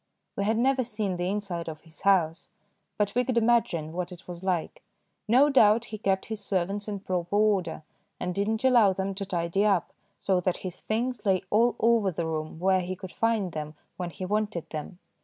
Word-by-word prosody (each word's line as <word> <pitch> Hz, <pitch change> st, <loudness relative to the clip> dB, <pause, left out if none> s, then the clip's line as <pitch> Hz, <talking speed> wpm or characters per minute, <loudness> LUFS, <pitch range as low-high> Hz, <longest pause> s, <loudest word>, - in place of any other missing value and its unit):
We 200 Hz, -, -1 dB
had 220 Hz, +2 st, +2 dB
never 260 Hz, +2 st, +2 dB
seen 210 Hz, -5 st, -3 dB
the 175 Hz, +1 st, -1 dB
inside 190 Hz, -5 st, -3 dB
of 155 Hz, -1 st, -8 dB
his 165 Hz, -1 st, -16 dB
house, 175 Hz, -4 st, +2 dB, 0.5 s
but 205 Hz, -1 st, 0 dB
we 250 Hz, -, +2 dB
could 250 Hz, -1 st, -1 dB
imagine 220 Hz, -9 st, +2 dB
what 180 Hz, +1 st, -3 dB
it 180 Hz, +1 st, -12 dB
was 175 Hz, 0 st, -8 dB
like. 180 Hz, -4 st, -2 dB, 0.5 s
No 265 Hz, +6 st, +5 dB
doubt 225 Hz, -3 st, +5 dB
he 215 Hz, -, -4 dB
kept 195 Hz, -2 st, 0 dB
his 220 Hz, -2 st, -6 dB
servants 195 Hz, +2 st, -1 dB
in 200 Hz, -2 st, -4 dB
proper 180 Hz, -1 st, -2 dB
order 200 Hz, -7 st, +1 dB, 0.4 s
and 180 Hz, -, -2 dB
did 200 Hz, +2 st, -1 dB
not 220 Hz, +1 st, -1 dB
allow 235 Hz, -7 st, +5 dB
them 195 Hz, +1 st, -2 dB
to 200 Hz, +1 st, -4 dB
tidy 175 Hz, +1 st, 0 dB
up, 195 Hz, -5 st, +1 dB, 0.2 s
so 190 Hz, -2 st, +1 dB
that 180 Hz, 0 st, 0 dB
his 180 Hz, -1 st, -5 dB
things 240 Hz, +3 st, -2 dB
lay 190 Hz, -3 st, +2 dB
all 235 Hz, +3 st, +4 dB
over 230 Hz, -3 st, +3 dB
the 170 Hz, -1 st, -3 dB
room 155 Hz, -1 st, -4 dB
where 185 Hz, +2 st, +2 dB
he 185 Hz, +1 st, -4 dB
could 185 Hz, -1 st, -9 dB
find 225 Hz, -5 st, 0 dB
them 155 Hz, -1 st, -5 dB, 0.2 s
when 180 Hz, -1 st, -4 dB
he 175 Hz, +3 st, -6 dB
wanted 210 Hz, -3 st, -1 dB
them. 155 Hz, +3 st, -6 dB
195 Hz, 205 wpm, -27 LUFS, 175-215 Hz, 0.5 s, No